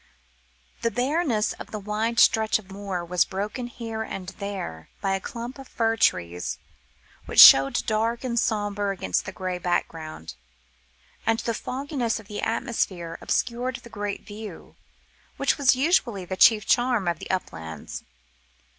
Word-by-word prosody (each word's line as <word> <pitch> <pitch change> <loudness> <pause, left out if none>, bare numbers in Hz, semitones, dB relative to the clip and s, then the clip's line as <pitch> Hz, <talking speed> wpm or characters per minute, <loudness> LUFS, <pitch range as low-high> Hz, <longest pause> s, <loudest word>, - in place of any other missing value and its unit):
The 230 - +1
bareness 250 -1 0
of - - -10
the 215 - -5
wide 215 +3 -1
stretch 220 -1 +5
of 195 -3 -14
moor 195 -3 -4
was 175 +1 +3
broken 210 +6 -4
here 230 -2 -6
and 190 -4 -5
there 190 - -5
by 195 -1 0
a 195 - 0
clump 240 +5 -7
of 270 - -10
fir 225 -1 0
trees, 90 - 0 0.7
which - - +1
showed 135 0 +9
dark 225 +2 0
and 235 -2 0
sombre 205 -3 0
against 95 - -1
the 190 - -5
grey 185 -1 -4
background, 160 - -3 0.9
and 225 0 +2
the 230 - -1
fogginess 255 -1 -2
of 215 - -14
the 210 - -5
atmosphere 195 -8 -2
obscured 250 +1 -1
the 235 - -10
great 205 -1 -4
view, 210 -3 -9 0.6
which - - +1
was 265 -3 +5
usually 255 - +1
the 185 - -4
chief 215 +2 +6
charm 240 -6 +2
of 170 -2 0
the - - -8
uplands. 80 - -5
215 Hz, 150 wpm, -25 LUFS, 185-235 Hz, 0.9 s, showed